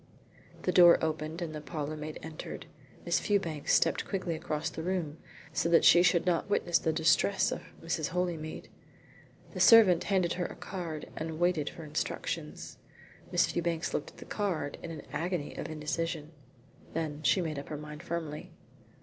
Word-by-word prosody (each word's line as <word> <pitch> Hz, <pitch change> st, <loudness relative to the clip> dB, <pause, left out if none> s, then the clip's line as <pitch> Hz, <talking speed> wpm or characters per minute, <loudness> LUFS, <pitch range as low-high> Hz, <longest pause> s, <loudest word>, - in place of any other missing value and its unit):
The 180 Hz, -, +1 dB
door 175 Hz, -1 st, +8 dB
opened 160 Hz, +2 st, -3 dB
and 160 Hz, -2 st, -5 dB
the 150 Hz, -, -5 dB
parlourmaid 155 Hz, 0 st, -5 dB
entered. 160 Hz, -1 st, -7 dB, 0.4 s
Miss -, -, +2 dB
Fewbanks 170 Hz, -8 st, 0 dB
stepped -, -, +2 dB
quickly 185 Hz, -4 st, -2 dB
across 160 Hz, 0 st, -3 dB
the 160 Hz, -, -5 dB
room 165 Hz, -3 st, -2 dB, 0.3 s
so 170 Hz, -, +1 dB
that 170 Hz, -, +5 dB
she 175 Hz, -, +8 dB
should 175 Hz, -1 st, +3 dB
not 180 Hz, +2 st, +1 dB
witness 175 Hz, -4 st, +2 dB
the 160 Hz, -, 0 dB
distress 165 Hz, +5 st, +3 dB
of -, -, -3 dB, 0.2 s
Mrs. 165 Hz, -2 st, -1 dB
Holymead. 170 Hz, -3 st, -3 dB, 0.8 s
The -, -, -6 dB
servant 215 Hz, -7 st, +7 dB
handed 185 Hz, -4 st, +2 dB
her 180 Hz, -1 st, -2 dB
a -, -, -9 dB
card 170 Hz, -5 st, -6 dB
and 160 Hz, 0 st, -4 dB
waited 175 Hz, -4 st, +2 dB
for 165 Hz, -, -10 dB
instructions. 150 Hz, -, -4 dB, 0.5 s
Miss -, -, +4 dB
Fewbanks 170 Hz, -1 st, -2 dB
looked 150 Hz, -, -2 dB
at -, -, -20 dB
the -, -, -10 dB
card 175 Hz, -9 st, -2 dB
in 170 Hz, -, -6 dB
an 160 Hz, -3 st, -7 dB
agony 175 Hz, -3 st, -2 dB
of -, -, -5 dB
indecision. 155 Hz, 0 st, -3 dB, 0.6 s
Then 155 Hz, -2 st, -3 dB
she 185 Hz, -, +3 dB
made 160 Hz, -5 st, -2 dB
up 140 Hz, -, -9 dB
her 150 Hz, -, -4 dB
mind 150 Hz, 0 st, -8 dB
firmly. 160 Hz, -3 st, -5 dB
165 Hz, 165 wpm, -30 LUFS, 155-175 Hz, 0.8 s, door